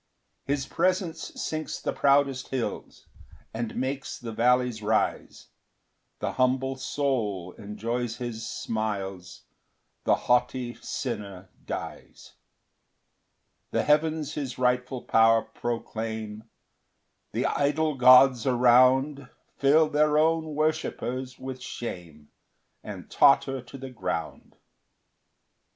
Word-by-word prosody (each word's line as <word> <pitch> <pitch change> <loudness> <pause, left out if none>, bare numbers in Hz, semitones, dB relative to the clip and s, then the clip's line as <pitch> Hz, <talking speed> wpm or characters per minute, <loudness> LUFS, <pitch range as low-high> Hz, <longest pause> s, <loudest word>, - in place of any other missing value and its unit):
2 140 - +2
His 135 -2 -2
presence 180 0 -1
sinks 155 0 -3
the - - -2
proudest 140 -2 +2
hills, 130 -3 -5 0.5
And 115 0 -4
makes 135 +2 -3
the 115 -2 -7
vallies 125 0 +2
rise 110 +1 -1 0.7
The - - -2
humble 130 +1 +1
soul 115 -10 -2
enjoys 115 +4 -4
his 120 -2 -5
smiles, 100 -5 -4 0.6
The - - +4
haughty 125 0 +1
sinner 95 -2 -5 0.2
dies. - - -7 1.4
3 - - -2
The - - +2
heavens 155 0 +1
his 135 -5 -4
rightful 125 0 0
power 115 0 +4
proclaim 110 -2 -5 0.9
The - - -1
idol 150 +2 +1
gods 130 -1 +6
around 130 +3 +4 0.3
Fill 150 +3 +5
their 150 0 +3
own 160 0 +1
worshippers 130 -4 -2
with 130 -1 -7
shame, 85 -12 -7 0.5
And - - -8
totter 135 -1 +4
to 125 +3 -11
the 135 0 -8
ground. 85 -9 -5
125 Hz, 105 wpm, -27 LUFS, 115-140 Hz, 1.4 s, gods